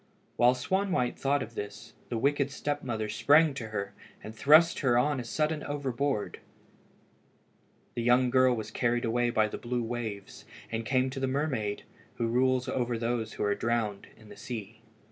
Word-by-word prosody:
While 125 +1 +4
Swanwhite 180 -1 0
thought 140 0 +1
of 115 - -10
this, 105 -1 -7 0.2
the 120 - -2
wicked 140 +3 +1
step 145 +1 -3
mother 110 -4 -3
sprang 145 +8 +4
to 125 -5 -6
her, 100 -2 -4 0.3
and 110 - -8
thrust 155 +8 +5
her 125 -4 +3
on 145 +2 +2
a - - -4
sudden 150 +5 -1
overboard. 140 -4 -2 1.5
The 120 - -3
young 125 +1 +3
girl 130 -1 +4
was 110 -2 -6
carried 120 0 0
away 120 +1 +1
by 110 -2 +2
the - - -6
blue 120 0 -2
waves, 110 -4 -5 0.3
and 115 -1 -3
came 130 0 +1
to 135 - -5
the 135 - 0
mermaid 130 -7 -2 0.3
who 115 - -1
rules 130 +1 +2
over 120 -1 -1
all - - -4
those 115 -1 -2
who - - -3
are 105 0 +2
drowned 110 -3 -2
in 110 -1 -16
the 105 - -11
sea. 110 -2 -7
120 Hz, 180 wpm, -29 LUFS, 110-135 Hz, 1.5 s, thrust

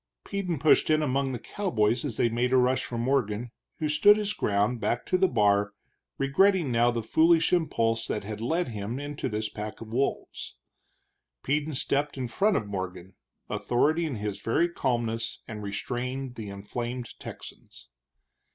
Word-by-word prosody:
Peden 190 -5 -2
pushed 155 +3 +4
in 155 0 +3
among 135 -1 0
the 125 - -3
cowboys 120 - 0
as 130 -7 -4
they - - +3
made 120 +2 0
a - - +6
rush 130 +1 +2
for 120 - -5
Morgan, 120 -2 0 0.3
who 155 - -1
stood 155 +8 +6
his 210 -1 -1
ground, 105 - +1
back 120 - -1
to - - 0
the 190 +1 +4
bar, 105 - +2 0.4
regretting 160 +3 +3
now 120 +1 +4
the 120 -1 -2
foolish 165 +7 +4
impulse 115 -9 +1
that 105 - -2
had 105 +1 -6
led 165 +6 0
him 110 +3 -4
into 145 0 -4
this 110 0 -2
pack 105 0 -6
of 115 0 -9
wolves. 135 +3 -2 0.9
Peden 150 +2 0
stepped 145 +2 0
in 130 -2 -2
front 200 - +2
of 105 - -2
Morgan, 95 -2 -5 0.3
authority 155 +7 +1
in 140 - -3
his 105 -2 -4
very 165 +10 +2
calmness, 120 -8 -2
and 105 -2 -6
restrained 125 +5 -4
the 110 -4 -7
inflamed 120 +5 -5
Texans. - - -11
125 Hz, 165 wpm, -27 LUFS, 110-150 Hz, 0.9 s, a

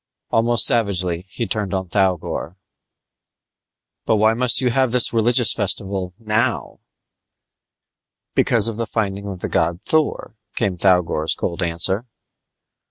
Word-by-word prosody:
Almost 115 +1 +3
savagely 95 -7 0
he 115 - -4
turned 105 -4 -2
on 95 -1 -3
Thougor. 95 -2 -1 1.5
"But - - +3
why 110 +1 +3
must 125 +1 +2
you 125 -2 +1
have 130 0 +1
this 125 -1 +2
religious 120 +1 +3
festival 95 -3 -2
now?" 115 +2 -1 1.5
"Because 115 -2 +3
of 115 -2 -4
the 115 -1 -3
finding 100 -3 -3
of 95 -3 -7
the - - -2
god 85 +1 0
Thor," 155 -4 -1 0.2
came 95 -2 -1
Thougor's 90 -4 +1
cold 85 +1 -4
answer. 90 +6 0
100 Hz, 125 wpm, -20 LUFS, 90-115 Hz, 1.5 s, Almost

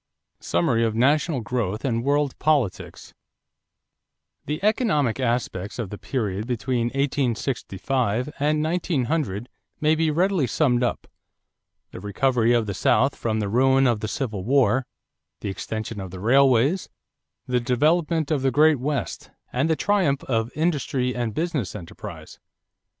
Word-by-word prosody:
SUMMARY 100 +7 +1
OF 110 -1 0
NATIONAL 140 +3 +2
GROWTH 110 -1 -2
AND 115 -3 0
WORLD 145 0 +1
POLITICS 145 -11 -1 1.3
The 150 +2 -2
economic 200 - +1
aspects 115 -6 -2
of 115 -6 -4
the 105 - -7
period 105 -4 -3
between 120 -1 -1
1865 125 -2 -1
and 150 +1 +1
1900 155 - -1 0.3
may 155 +1 +3
be 160 0 +1
readily 175 -2 +1
summed 125 -1 +2
up: 120 - -1 0.8
the - - -8
recovery 115 +4 +1
of 120 -2 +3
the 100 - -3
South 135 +7 +2
from 110 -1 -2
the 105 - -1
ruin 130 +5 +3
of 120 -4 +2
the 110 - -3
Civil 110 -5 -3
War, 130 +1 +2 0.5
the - - -3
extension 110 +1 -5
of 95 - -6
the 95 +1 -9
railways, 135 - +3 0.6
the 125 -1 +1
development 155 +6 +1
of 145 -3 +1
the 135 - +2
Great 150 +2 +4
West, 140 -2 -3 0.2
and 135 +6 +1
the 160 - +3
triumph 180 -8 +1
of 115 -1 -1
industry 140 -5 0
and 120 -3 -2
business 155 - -2
enterprise. 90 -5 -9
130 Hz, 140 wpm, -24 LUFS, 115-150 Hz, 1.3 s, Great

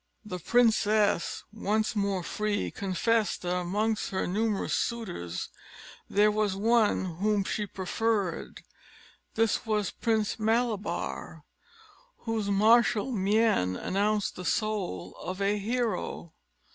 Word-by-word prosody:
The 180 -3 -5
princess, 215 -3 +2
once 215 0 0
more 200 -3 0
free, 210 +3 -2
confessed 205 +3 0
that 180 0 -1
amongst 205 +5 -1
her 190 - -1
numerous 210 +2 0
suitors 90 - -3 0.6
there 210 +1 +4
was 210 -2 0
one 220 -1 +2
whom 205 +1 +1
she 210 +2 -2
preferred; 200 -1 -2 0.7
this 225 -1 +2
was 210 -3 0
Prince 220 -1 0
Malabar, 220 -1 -1 0.8
whose 225 -3 -2
martial 220 +3 +4
mien 205 - +2
announced 205 - 0
the 180 - -6
soul 200 - -2
of 185 +1 -5
a 200 +1 +1
hero. 225 -6 -2
210 Hz, 105 wpm, -28 LUFS, 195-225 Hz, 0.8 s, there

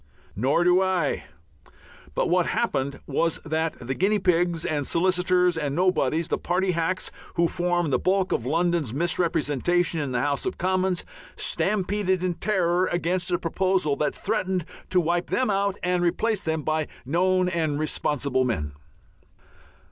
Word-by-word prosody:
Nor 135 - +2
do 180 +1 +4
I. 185 -6 0 0.9
But - - +1
what 180 0 +2
happened 140 0 -1
was 165 -1 0
that 160 +1 -1
the 125 +2 -3
guinea 200 +8 +2
pigs 175 -3 +1
and 145 -3 -1
solicitors 180 0 +2
and 145 -3 -2
nobodies, 170 -3 +1
the - - -1
party 185 +1 0
hacks 170 +2 -1 0.2
who 170 -1 +3
form 175 -2 0
the 130 - +2
bulk 190 0 +1
of - - 0
London's 165 -2 0
misrepresentation 170 0 0
in 145 -3 -2
the 125 - 0
House 145 0 -1
of - - -3
Commons, 185 0 0 0.3
stampeded 190 -2 0
in 180 -1 0
terror 180 -2 +1
against 175 +1 0
a 175 - +2
proposal 185 -3 0
that 150 - -1
threatened 190 -5 -1 0.2
to 185 - +3
wipe 175 +1 0
them 255 -5 +1
out 200 0 0
and 180 0 +1
replace 195 +5 +1
them 160 -1 -1
by 155 0 0 0.2
known 185 +5 +2
and 160 -5 0
responsible 140 -3 0
men. 75 - -2
175 Hz, 150 wpm, -25 LUFS, 155-185 Hz, 0.9 s, do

